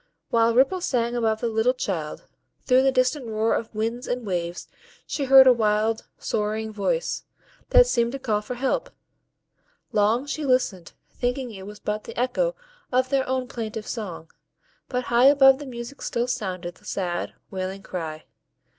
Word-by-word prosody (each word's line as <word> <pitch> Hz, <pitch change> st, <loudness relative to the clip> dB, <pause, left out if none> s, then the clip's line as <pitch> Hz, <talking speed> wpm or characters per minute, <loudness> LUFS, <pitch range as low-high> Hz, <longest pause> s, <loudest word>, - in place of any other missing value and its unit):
While 230 Hz, 0 st, +3 dB
Ripple 275 Hz, +9 st, +3 dB
sang 240 Hz, -6 st, 0 dB
above 220 Hz, -2 st, 0 dB
the 235 Hz, -, 0 dB
little 225 Hz, +3 st, +2 dB
child, 170 Hz, -11 st, -3 dB, 0.4 s
through 255 Hz, 0 st, +4 dB
the 270 Hz, 0 st, +3 dB
distant 255 Hz, 0 st, +1 dB
roar 220 Hz, 0 st, +1 dB
of 225 Hz, -1 st, -3 dB
winds 230 Hz, +3 st, -2 dB
and 245 Hz, -1 st, -2 dB
waves 175 Hz, -3 st, -3 dB, 0.4 s
she 280 Hz, -, -2 dB
heard 265 Hz, 0 st, +9 dB
a 255 Hz, -, +8 dB
wild, 220 Hz, 0 st, +1 dB
sorrowing 215 Hz, +1 st, -2 dB
voice, 485 Hz, -, -1 dB, 0.5 s
that -, -, +7 dB
seemed 235 Hz, -, +1 dB
to -, -, -2 dB
call 220 Hz, -6 st, -1 dB
for 245 Hz, +4 st, -6 dB
help. 260 Hz, +2 st, -1 dB, 1.0 s
Long 215 Hz, +5 st, +2 dB
she 300 Hz, +1 st, -4 dB
listened, 255 Hz, -, 0 dB, 0.2 s
thinking 245 Hz, 0 st, -2 dB
it 195 Hz, -2 st, -9 dB
was 210 Hz, 0 st, -10 dB
but 210 Hz, 0 st, -3 dB
the -, -, -6 dB
echo -, -, 0 dB, 0.4 s
of 255 Hz, 0 st, +2 dB
their 265 Hz, -1 st, +1 dB
own 260 Hz, -1 st, -1 dB
plaintive 220 Hz, -2 st, -5 dB
song, 180 Hz, -8 st, -6 dB, 0.6 s
but 250 Hz, -1 st, -1 dB
high 240 Hz, +1 st, +3 dB
above 270 Hz, -1 st, +7 dB
the 290 Hz, -, -7 dB
music 240 Hz, +2 st, -8 dB
still 240 Hz, 0 st, -1 dB
sounded 185 Hz, -8 st, -3 dB
the -, -, -23 dB
sad, 175 Hz, -3 st, -3 dB, 0.2 s
wailing 190 Hz, 0 st, -4 dB
cry. 160 Hz, -3 st, -5 dB
235 Hz, 165 wpm, -25 LUFS, 210-255 Hz, 1.0 s, heard